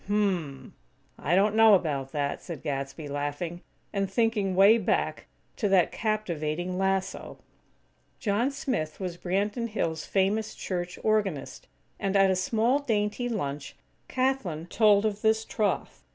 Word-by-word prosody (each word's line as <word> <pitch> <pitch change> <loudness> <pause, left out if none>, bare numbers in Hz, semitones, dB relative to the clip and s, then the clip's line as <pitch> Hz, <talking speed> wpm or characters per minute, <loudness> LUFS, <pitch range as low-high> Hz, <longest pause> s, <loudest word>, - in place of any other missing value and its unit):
"Hm 205 - 0
m 205 -2 +3
m! 140 -7 -7 0.5
I 160 +5 +1
don't 200 +2 +3
know 220 -1 +7
about 140 -7 -1
that," 145 -2 -2
said 165 -6 -8
Gadsby, 140 +1 -4
laughing; 145 +5 -4 0.3
and 195 -1 0
thinking 205 -2 +1
way 200 +5 +7
back 205 - -1 0.3
to 210 - 0
that 190 -3 +4
captivating 180 -5 -2
lasso! 190 0 -1 0.8
John 225 +3 +1
Smith 250 - -3
was 180 -3 -4
Branton 205 +6 -1
Hills' 165 -7 -2
famous 205 +3 0
church 175 -1 -4
organist; 205 -9 -1 0.3
and, 195 0 -1
at 195 -1 +5
a - - +2
small, 225 +8 +2
dainty 225 -2 -1
lunch, 145 - -4 0.3
Kathlyn 255 -12 -1
told 210 -2 +4
of 210 -1 -1
this 220 0 +2
troth. 210 -2 -2
195 Hz, 140 wpm, -27 LUFS, 165-215 Hz, 0.8 s, know